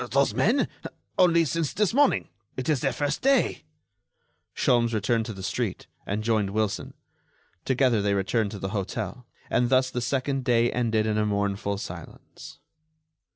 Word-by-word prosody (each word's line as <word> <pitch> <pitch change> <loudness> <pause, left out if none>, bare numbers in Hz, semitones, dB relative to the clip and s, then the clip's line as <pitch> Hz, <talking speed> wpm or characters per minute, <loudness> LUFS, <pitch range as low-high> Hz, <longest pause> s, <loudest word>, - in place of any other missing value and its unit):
"Those 140 +4 +2
men?... 240 +8 +2 0.5
only 170 -2 +5
since 160 +1 -1
this 210 0 +1
morning. 285 +2 +3 0.3
It's 135 +2 0
their 135 - 0
first 145 +4 -2
day." 275 +1 +2 0.9
Sholmes 120 -4 +2
returned 110 +2 0
to 110 - -5
the 95 -1 -9
street, 95 +2 -2 0.2
and 105 +2 -2
joined 110 -3 +1
Wilson. 105 0 -2 0.7
Together 130 -4 +2
they 100 0 +1
returned 100 +3 0
to 100 - -7
the 95 - -3
hotel, 105 +5 -4 0.2
and 120 0 +1
thus 130 0 +3
the 125 - -2
second 135 +2 -1
day 120 -1 +3
ended 115 -3 +1
in 110 -1 0
a 105 - +2
mournful 100 0 -1
silence. - - -10
120 Hz, 155 wpm, -26 LUFS, 105-135 Hz, 0.9 s, only